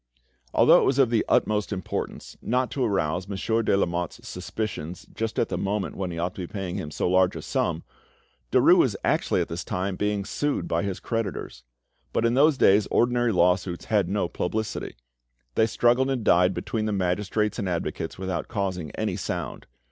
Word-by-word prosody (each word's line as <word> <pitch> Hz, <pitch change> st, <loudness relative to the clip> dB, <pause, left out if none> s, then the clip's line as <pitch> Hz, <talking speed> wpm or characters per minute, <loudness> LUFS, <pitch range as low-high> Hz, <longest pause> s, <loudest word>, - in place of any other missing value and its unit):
Although -, -, +7 dB
it -, -, +2 dB
was 135 Hz, -, +2 dB
of 130 Hz, -4 st, +4 dB
the 115 Hz, -2 st, +3 dB
utmost 105 Hz, 0 st, +2 dB
importance 95 Hz, -3 st, -4 dB
not 125 Hz, +1 st, 0 dB
to 135 Hz, -, -1 dB
arouse 95 Hz, -4 st, 0 dB
Monsieur 110 Hz, +3 st, 0 dB
de 105 Hz, -, +2 dB
Lamotte's 85 Hz, -3 st, -2 dB
suspicions 90 Hz, -3 st, -5 dB
just 115 Hz, -1 st, -3 dB
at -, -, +1 dB
the -, -, -2 dB
moment 100 Hz, 0 st, -2 dB
when 95 Hz, -2 st, -3 dB
he 85 Hz, -, -5 dB
ought 90 Hz, +2 st, -2 dB
to -, -, -7 dB
be 90 Hz, -, -7 dB
paying 95 Hz, -4 st, -4 dB
him 75 Hz, -, -4 dB
so 75 Hz, -, -1 dB
large 95 Hz, 0 st, +3 dB
a -, -, -5 dB
sum, -, -, -1 dB, 0.7 s
Derues -, -, +6 dB
was -, -, +3 dB
actually -, -, +1 dB
at -, -, -2 dB
this 85 Hz, +2 st, -4 dB
time 95 Hz, +1 st, -2 dB
being 105 Hz, 0 st, -1 dB
sued 145 Hz, +6 st, -1 dB
by 85 Hz, -, 0 dB
his 100 Hz, -1 st, -3 dB
creditors. 115 Hz, -4 st, -4 dB, 0.5 s
But 115 Hz, -, +1 dB
in 115 Hz, -, +3 dB
those 145 Hz, +2 st, +4 dB
days 100 Hz, -2 st, +5 dB
ordinary 120 Hz, 0 st, +2 dB
lawsuits 90 Hz, -1 st, +1 dB
had 100 Hz, -5 st, +3 dB
no 100 Hz, -2 st, 0 dB
publicity; 110 Hz, +6 st, -3 dB, 0.6 s
they 110 Hz, -, +3 dB
struggled 120 Hz, +4 st, +2 dB
and 130 Hz, -4 st, -1 dB
died 90 Hz, 0 st, +4 dB
between 110 Hz, -2 st, -2 dB
the -, -, 0 dB
magistrates 100 Hz, +3 st, 0 dB
and 100 Hz, -4 st, -1 dB
advocates 85 Hz, -2 st, -3 dB
without 95 Hz, -2 st, -3 dB
causing 95 Hz, -7 st, -3 dB
any -, -, -2 dB
sound. -, -, -4 dB
100 Hz, 185 wpm, -26 LUFS, 90-115 Hz, 0.7 s, Although